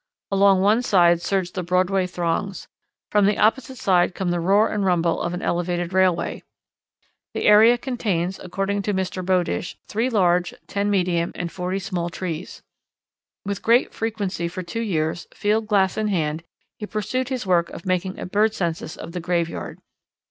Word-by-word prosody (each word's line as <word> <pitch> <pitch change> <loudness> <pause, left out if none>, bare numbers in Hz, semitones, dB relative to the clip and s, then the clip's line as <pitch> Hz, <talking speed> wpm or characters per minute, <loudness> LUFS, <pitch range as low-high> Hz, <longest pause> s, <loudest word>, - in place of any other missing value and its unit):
Along 195 -1 +4
one 210 +4 +4
side 175 -7 +4
surge 185 0 -1
the 185 - -3
Broadway 185 +2 +1
throngs. 180 +2 -3 0.4
From 205 -1 +4
the 205 - +1
opposite 260 +4 +1
side 180 -4 +2
come 185 -2 -1
the 175 - 0
roar 200 +5 +4
and 210 -1 -1
rumble 175 -3 +1
of 170 +1 -2
an 180 - -6
elevated 175 0 -1
railway. 185 -2 +1 0.9
The - - -2
area 220 +3 +7
contains, 200 -8 -2
according 195 +2 -2
to 205 0 -1
Mr. 185 0 -2
Bowdish, 180 -1 0
three 230 +4 -1
large, 180 -5 +2
ten 200 0 -1
medium, 180 -4 +1
and 170 -1 -4
forty 180 +1 -3
small 185 -4 -3
trees. 170 -1 -6 0.8
With 200 -1 -3
great 235 +3 +3
frequency 200 -6 -2
for 180 +2 -6
two 205 +6 -4
years, 170 -5 -2
field 215 +1 0
glass 195 -3 +2
in 215 - 0
hand, 160 -5 -1 0.4
he 210 - -5
pursued 245 +5 -2
his 255 -5 -3
work 175 -2 +2
of - - -10
making 185 0 -1
a - - -5
bird 210 +4 +1
census 165 -3 -3
of 165 - -8
the 180 - -4
graveyard. 170 -1 -2
185 Hz, 170 wpm, -23 LUFS, 175-205 Hz, 0.9 s, area